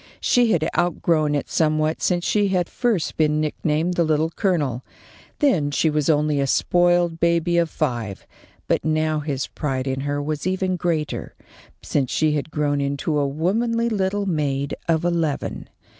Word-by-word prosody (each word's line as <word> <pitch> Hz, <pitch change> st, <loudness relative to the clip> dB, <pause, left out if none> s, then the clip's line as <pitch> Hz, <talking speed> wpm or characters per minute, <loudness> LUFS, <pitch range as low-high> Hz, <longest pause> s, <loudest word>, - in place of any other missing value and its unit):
She 240 Hz, -2 st, +3 dB
had 160 Hz, -4 st, +2 dB
outgrown 160 Hz, -3 st, +1 dB
it 145 Hz, -, -2 dB
somewhat 155 Hz, 0 st, +1 dB
since 175 Hz, -1 st, 0 dB
she 205 Hz, -1 st, +2 dB
had 180 Hz, -2 st, 0 dB
first 230 Hz, -9 st, -1 dB
been 155 Hz, -1 st, +2 dB
nicknamed 155 Hz, +2 st, 0 dB
the 175 Hz, -, +2 dB
Little 155 Hz, 0 st, +1 dB
Colonel. 150 Hz, -, -1 dB, 0.5 s
Then 185 Hz, -, +2 dB
she 155 Hz, +2 st, +1 dB
was 150 Hz, -1 st, 0 dB
only 150 Hz, -1 st, +2 dB
a 140 Hz, -, +1 dB
spoiled 175 Hz, +2 st, +2 dB
baby 170 Hz, +1 st, +2 dB
of 170 Hz, -1 st, +1 dB
five; 115 Hz, -9 st, -3 dB, 0.4 s
but -, -, +1 dB
now 155 Hz, 0 st, +1 dB
his 145 Hz, -3 st, -2 dB
pride 135 Hz, -3 st, -3 dB
in 135 Hz, -1 st, -2 dB
her 145 Hz, +1 st, -2 dB
was 150 Hz, +3 st, -3 dB
even 185 Hz, 0 st, 0 dB
greater, 165 Hz, -4 st, -2 dB, 0.5 s
since 135 Hz, -4 st, 0 dB
she 155 Hz, -1 st, +1 dB
had 150 Hz, 0 st, -2 dB
grown 145 Hz, -2 st, 0 dB
into 140 Hz, +2 st, -1 dB
a 140 Hz, -, +1 dB
womanly 230 Hz, +11 st, 0 dB
little 200 Hz, -1 st, -1 dB
maid 145 Hz, -5 st, -1 dB, 0.2 s
of 165 Hz, 0 st, +2 dB
eleven. 165 Hz, -4 st, -2 dB
155 Hz, 160 wpm, -22 LUFS, 145-175 Hz, 0.5 s, She